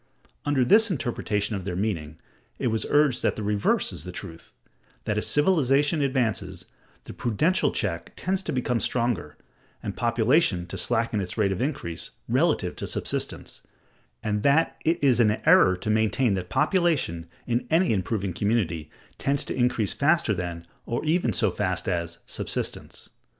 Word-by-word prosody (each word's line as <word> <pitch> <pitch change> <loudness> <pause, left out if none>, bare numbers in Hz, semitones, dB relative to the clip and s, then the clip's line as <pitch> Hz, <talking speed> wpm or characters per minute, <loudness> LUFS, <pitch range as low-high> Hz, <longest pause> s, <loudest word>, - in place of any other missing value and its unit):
Under 140 -3 +2
this 220 - +5
interpretation 110 - -1
of 95 - -4
their 90 -1 -4
meaning, 85 -6 -3 0.4
it 125 - 0
was 110 -1 -1
urged 145 -4 +3
that - - +1
the 110 - -5
reverse 105 0 +1
is - - -6
the - - -7
truth: 80 0 -9 0.5
that - - -1
as - - -1
civilization 145 -2 +3
advances, 110 -9 -1 0.4
the - - -9
prudential 150 - +1
check 95 -8 -2
tends 190 +1 -1
to - - -4
become 125 -2 0
stronger, 115 -13 -1 0.5
and - - -4
population 120 - +2
to 90 - -8
slacken 115 -2 0
its 90 +3 -4
rate 100 -3 +2
of 95 - -2
increase, 125 - -3 0.2
relatively - - +1
to - - -4
subsistence; - - -3 0.6
and 105 -2 -1
that 145 +6 +3
it 165 +2 +2
is 130 -4 +4
an 110 -2 +4
error 90 0 +6
to 105 +4 -2
maintain 110 +2 +2
that 90 -2 -3
population, 155 - +1 0.2
in 120 0 -1
any 165 -3 +3
improving 100 -1 -2
community, 90 -7 -1 0.3
tends 140 +1 0
to - - -4
increase 120 -5 +1
faster 155 -4 +2
than, 85 -2 -5 0.2
or 120 +6 -2
even 155 -6 +2
so - - +2
fast - - -2
as, 85 -1 -2
subsistence. - - -4
115 Hz, 160 wpm, -25 LUFS, 95-140 Hz, 0.6 s, error